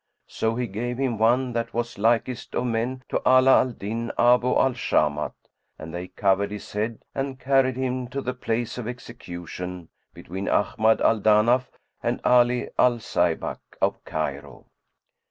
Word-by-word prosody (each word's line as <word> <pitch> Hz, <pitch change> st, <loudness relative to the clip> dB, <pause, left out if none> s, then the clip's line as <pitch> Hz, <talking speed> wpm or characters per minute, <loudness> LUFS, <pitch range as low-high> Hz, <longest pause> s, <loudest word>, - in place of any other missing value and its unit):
So 110 Hz, 0 st, -2 dB
he 125 Hz, +1 st, -1 dB
gave 120 Hz, +4 st, -4 dB
him 130 Hz, -5 st, -1 dB
one 120 Hz, +3 st, +2 dB
that 115 Hz, -1 st, -3 dB
was 120 Hz, -3 st, -3 dB
likest 120 Hz, +3 st, 0 dB
of 125 Hz, -, 0 dB
men 125 Hz, +2 st, -2 dB
to -, -, -1 dB
Ala 130 Hz, +1 st, +6 dB
al 130 Hz, -, +1 dB
Din 115 Hz, +2 st, -4 dB
Abu 125 Hz, +1 st, +4 dB
al 130 Hz, +1 st, +3 dB
Shamat; 75 Hz, -10 st, 0 dB, 0.4 s
and 80 Hz, +1 st, -9 dB
they 90 Hz, +1 st, -5 dB
covered 100 Hz, +1 st, +1 dB
his 105 Hz, -1 st, -8 dB
head 110 Hz, +2 st, -3 dB
and 135 Hz, -1 st, -3 dB
carried 130 Hz, -1 st, +2 dB
him 130 Hz, -1 st, -2 dB
to 135 Hz, +3 st, -4 dB
the 125 Hz, -2 st, -3 dB
place 120 Hz, -1 st, -3 dB
of 115 Hz, -, -5 dB
execution 90 Hz, -7 st, -7 dB, 0.2 s
between 95 Hz, +3 st, -6 dB
Ahmad 110 Hz, +2 st, +2 dB
al 110 Hz, -, +3 dB
Danaf 110 Hz, +5 st, +4 dB, 0.3 s
and -, -, -1 dB
Ali 125 Hz, 0 st, +3 dB
al 125 Hz, -, +6 dB
Zaybak 90 Hz, -6 st, -1 dB, 0.2 s
of -, -, 0 dB
Cairo. 70 Hz, -3 st, -5 dB
115 Hz, 155 wpm, -25 LUFS, 100-125 Hz, 0.4 s, Ala